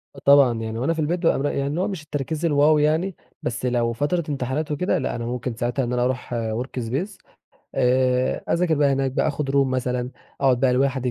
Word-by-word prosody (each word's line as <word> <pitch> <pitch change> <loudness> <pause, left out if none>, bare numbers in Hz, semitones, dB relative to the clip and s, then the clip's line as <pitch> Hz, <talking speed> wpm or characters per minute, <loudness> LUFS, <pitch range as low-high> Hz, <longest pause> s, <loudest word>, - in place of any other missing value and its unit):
آه - - -10
طبعًا، 140 -5 +6
يعني 110 0 -4
وأنا 140 +7 +1
في 160 - -6
البيت 165 +4 0
بابقى 165 -5 +2
مر 140 - -1
يعني 140 0 0
اللي 155 +6 -1
هو 195 - 0
مش 185 -6 -5
التركيز 150 +2 -3
الwow 150 0 +4
يعني 160 +5 +1 0.3
بس 120 +1 -3
لو 120 -1 +1
فترة 150 +8 0
امتحانات 140 +2 -2
وكده 180 +6 0
لأ - - -2
أنا 115 - -4
ممكن 125 0 -3
ساعتها 120 +3 -1
إن 120 - -3
أنا 125 0 +1
أروح 125 -1 -2
workspace 120 - -3 0.7
آآ 125 0 +1
أذاكر 170 -1 +2
بقى 145 -1 +3
هناك 135 0 0
بقى، - - +1
آخد 145 -1 -2
room - - -3
مثلًا 125 -1 -2 0.3
أقعد 130 -3 +3
بقى 130 -2 +3
لوحدي 130 -1 +1
135 Hz, 210 wpm, -23 LUFS, 125-150 Hz, 0.7 s, طبعًا